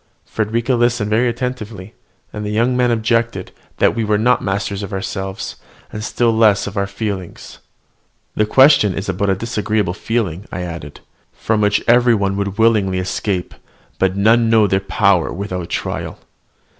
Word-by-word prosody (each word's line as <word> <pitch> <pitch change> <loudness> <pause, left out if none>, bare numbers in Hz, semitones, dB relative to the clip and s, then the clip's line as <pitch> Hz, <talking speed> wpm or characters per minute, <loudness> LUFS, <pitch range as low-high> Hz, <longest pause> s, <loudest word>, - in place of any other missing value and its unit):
Frederica 115 +4 -1
listened 120 -3 +1
very 120 +3 +3
attentively: 115 -5 -5 0.4
and 105 - -5
the 105 - -3
young 115 +4 +1
man 125 -1 +2
objected, 115 -3 0 0.3
that - - +3
we 115 - -2
were 105 -1 +1
not 120 +3 +2
masters 100 0 -2
of 100 - -6
ourselves, 95 0 -5 0.4
and 105 - -5
still 115 +1 +1
less 110 -3 +4
so - - -3
of - - -16
our 100 -1 0
feelings. 100 -3 -6 0.7
"The 105 - +1
question 130 -5 +5
is 100 - -4
about 100 +2 -1
a 95 - +2
disagreeable 105 -2 -1
feeling," 100 -3 -3
I 95 - -4
added, 85 -4 -8 0.3
"from 110 -1 -1
which 105 -1 +2
every 120 0 +5
one 100 -2 0
would 100 -1 -3
willingly 105 -5 +2
escape, 90 0 -2 0.5
but 95 0 +1
none 115 +3 +3
know 110 -2 +5
their 95 -1 +1
own 95 - -25
power 95 -1 +2
without 90 -2 -5
trial. - - -4
105 Hz, 170 wpm, -18 LUFS, 95-115 Hz, 0.7 s, question